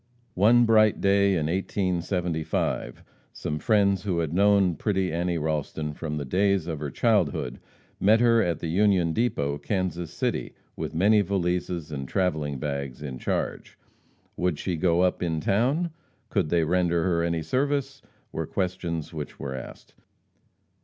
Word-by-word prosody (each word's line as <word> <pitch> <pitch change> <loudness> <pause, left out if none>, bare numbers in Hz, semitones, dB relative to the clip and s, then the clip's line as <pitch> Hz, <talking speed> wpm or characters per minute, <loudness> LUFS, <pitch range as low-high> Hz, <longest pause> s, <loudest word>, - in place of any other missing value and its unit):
One 115 +6 +5
bright 110 -2 +4
day, 100 0 +3
in 80 -3 0
1875, 90 -2 -2 0.3
some 75 - -4
friends 100 +1 +2
who 90 -3 -2
had 80 -2 -1
known 100 -1 +4
pretty 95 -4 -1
Annie 85 0 0
Ralston 75 -1 -2
from 75 0 -4
the 70 - -3
days 95 +4 +1
of 80 -3 -4
her 75 -1 -3
childhood, 65 -1 0 0.4
met 110 +3 +5
her 115 -1 +4
at 85 -5 -1
the 85 - -3
Union 90 -1 +2
Depot, 70 -10 0
Kansas 85 +1 -2
City, - - -3 0.2
with - - -5
many 105 +5 +4
valises 90 -4 -2
and 70 -2 -5
travelling 75 -7 -1
bags 70 -1 -4
in 65 -4 -6
charge. - - -3 0.6
"Would 90 -4 0
she 90 +2 -2
go 85 +1 +2
up 90 0 +1
in 80 -3 -1
town? 130 - +1 0.4
Could 75 - 0
they 85 0 +2
render 85 0 +1
her 85 -2 +1
any 85 -1 -1
service?" 135 - -1 0.3
were 80 -1 -3
questions 90 -4 -3
which 75 -2 -6
were 65 -1 -4
asked. 65 -1 -9
90 Hz, 150 wpm, -26 LUFS, 80-100 Hz, 0.6 s, One